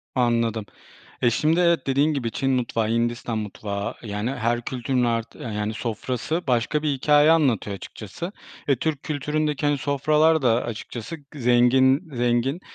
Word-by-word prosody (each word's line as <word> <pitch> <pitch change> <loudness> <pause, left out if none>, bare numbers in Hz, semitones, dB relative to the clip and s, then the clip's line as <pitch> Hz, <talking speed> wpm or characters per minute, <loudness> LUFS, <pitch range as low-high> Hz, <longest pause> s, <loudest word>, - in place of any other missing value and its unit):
Anladım. 115 -3 +1 0.6
E, 120 - +4
şimdi, 155 +8 +2
evet, 170 -6 +2
dediğin 140 +3 +2
gibi 120 -5 -2
Çin 135 +4 -1
mutfağı, 120 -4 0
Hindistan 115 0 -1
mutfağı, 100 -1 -4
yani, 105 +2 -3
her 120 -2 -1
kültürün 125 0 -1
art 115 -1 -1
yani, 105 -1 -4
sofrası 125 - -3
başka 125 +4 +1
bir 150 -2 +1
hikâye 150 +3 +4
anlatıyor 125 - +2
açıkçası 110 - -8 0.4
ve 140 - +4
Türk 150 +2 -2
kültüründeki, 150 0 -1
hani, 145 -1 +2
sofralar 150 +3 +2
da 120 -1 +2
açıkçası 120 +6 -6 0.2
zengin, 130 +4 +3
zengin. 120 +6 +1
125 Hz, 140 wpm, -24 LUFS, 115-145 Hz, 0.6 s, E